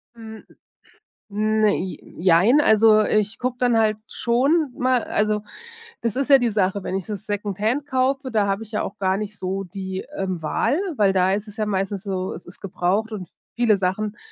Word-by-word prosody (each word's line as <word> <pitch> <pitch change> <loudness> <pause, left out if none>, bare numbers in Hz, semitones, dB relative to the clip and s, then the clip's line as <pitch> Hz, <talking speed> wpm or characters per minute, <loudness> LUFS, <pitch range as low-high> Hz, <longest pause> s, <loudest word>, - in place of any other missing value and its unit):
Hm, 220 -1 -10 0.9
ne 215 0 +2
i 185 0 -5 0.2
jein, 190 - +5
also, 220 -2 +5
äh, 215 - +1
ich 210 +1 -3
gucke 250 0 -2
dann 245 -2 +3
halt 215 -1 +2
schon 275 +5 +1
mal 255 -1 +2
also 210 0 0 0.6
das 230 -3 -1
ist 275 +1 -1
ja 275 - +10
die 240 -2 +1
Sache 200 -1 0
wenn 185 - -4
ich 195 - -4
so 215 - -3
Second 205 -1 -4
Hand 250 +8 0
kaufe, 265 0 0
da 210 -3 +1
habe 195 +2 -1
ich 220 - -14
ja 210 - 0
auch 205 - -6
gar 190 -1 +1
nicht 210 0 -6
so, 190 +1 -3
ähm, 180 - -13
die 190 -1 -5
Wahl, 185 - -1 0.2
weil 200 -2 +3
da 185 0 +3
ist 210 +2 -2
es 210 - -12
ja 215 - 0
meistens 195 -1 -2
so, 190 -2 -3
es - - -10
ist 175 - -14
gebraucht 195 +3 -1
und 185 -5 -6 0.3
viele 235 -3 +3
Sachen 200 +3 -2
210 Hz, 200 wpm, -22 LUFS, 195-230 Hz, 0.9 s, ja